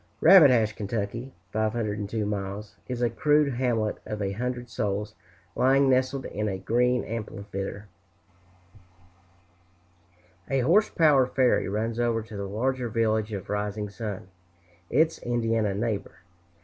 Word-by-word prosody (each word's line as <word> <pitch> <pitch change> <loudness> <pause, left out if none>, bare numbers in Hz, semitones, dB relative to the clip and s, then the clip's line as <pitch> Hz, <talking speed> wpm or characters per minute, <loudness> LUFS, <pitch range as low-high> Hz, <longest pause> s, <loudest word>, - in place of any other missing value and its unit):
Rabbit 170 -4 +8
Hash, 110 -4 +3
Ky. 110 +4 -4 0.2
(502 105 -1 -1
miles), 100 0 -4
is 125 -1 -3
a 120 - +3
crude 150 +2 +2
hamlet 120 -4 0
of 105 - -5
a 100 -1 -1
hundred 125 +3 -4
souls, 105 -2 -3 0.4
lying 135 +1 +4
nestled 130 +1 +1
in 105 +1 -3
a 95 - -3
green 125 +5 +1
amphitheater. 100 -2 -6 2.6
A 135 -1 +1
horse 190 - +4
power 145 -6 +4
ferry 130 -6 +2
runs 110 +3 -2
over 115 -2 +1
to 110 -1 -11
the 100 -1 -4
larger 125 +3 -1
village 110 -1 0
of 100 -3 -5
Rising 105 0 -2
Sun, 100 -2 -6 0.6
its 160 +5 +2
Indiana 115 -4 0
neighbor. 110 -1 -2
115 Hz, 125 wpm, -26 LUFS, 105-125 Hz, 2.6 s, Rabbit